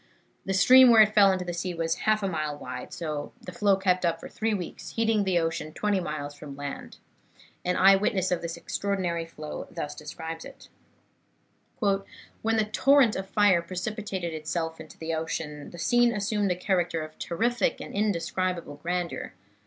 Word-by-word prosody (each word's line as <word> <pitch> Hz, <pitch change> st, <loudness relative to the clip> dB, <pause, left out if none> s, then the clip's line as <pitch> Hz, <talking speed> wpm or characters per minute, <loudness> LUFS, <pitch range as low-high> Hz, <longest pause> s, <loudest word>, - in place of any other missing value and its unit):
The 195 Hz, -, 0 dB
stream 255 Hz, +7 st, +8 dB
where 225 Hz, -2 st, +9 dB
it 215 Hz, 0 st, -1 dB
fell 200 Hz, -2 st, +6 dB
into 185 Hz, -1 st, -2 dB
the 175 Hz, -, -3 dB
sea 175 Hz, +1 st, -3 dB
was 165 Hz, 0 st, 0 dB, 0.2 s
half 215 Hz, -1 st, +3 dB
a -, -, +1 dB
mile 155 Hz, -4 st, -2 dB
wide, -, -, -7 dB
and 150 Hz, -3 st, -3 dB
the 230 Hz, -, -9 dB
flow 205 Hz, -4 st, +3 dB
kept 185 Hz, -1 st, +1 dB
up 165 Hz, -1 st, +1 dB
for -, -, -8 dB
three 225 Hz, 0 st, -2 dB
weeks, 185 Hz, -5 st, -5 dB
heating 225 Hz, -2 st, +2 dB
the 185 Hz, -2 st, +2 dB
ocean 165 Hz, -2 st, -2 dB
twenty 205 Hz, -2 st, 0 dB
miles 150 Hz, -4 st, -4 dB
from 145 Hz, -1 st, -10 dB
land. 140 Hz, 0 st, -7 dB, 0.7 s
An 180 Hz, -, 0 dB
eye 195 Hz, +1 st, +7 dB
witness 195 Hz, -2 st, 0 dB
of 180 Hz, -, 0 dB
this 170 Hz, 0 st, -5 dB
extraordinary 180 Hz, -4 st, -2 dB
flow 155 Hz, -2 st, -7 dB
thus 150 Hz, -, -5 dB
describes 160 Hz, +2 st, -7 dB
it: -, -, -13 dB, 1.1 s
"When 205 Hz, +2 st, -2 dB
the 215 Hz, -, +2 dB
torrent 260 Hz, +2 st, +4 dB
of 190 Hz, 0 st, -5 dB
fire 205 Hz, -5 st, +4 dB
precipitated 185 Hz, 0 st, -4 dB
itself 160 Hz, +1 st, -3 dB
into 155 Hz, -, -11 dB
the 165 Hz, 0 st, -4 dB
ocean, 155 Hz, -2 st, -4 dB
the 175 Hz, -, -11 dB
scene 240 Hz, +6 st, +3 dB
assumed 205 Hz, -1 st, 0 dB
a -, -, +1 dB
character 175 Hz, -3 st, 0 dB
of 155 Hz, 0 st, -11 dB
terrific 230 Hz, +6 st, 0 dB
and -, -, -8 dB
indescribable 185 Hz, -5 st, -1 dB
grandeur. 175 Hz, -, -3 dB
180 Hz, 175 wpm, -27 LUFS, 165-205 Hz, 1.1 s, where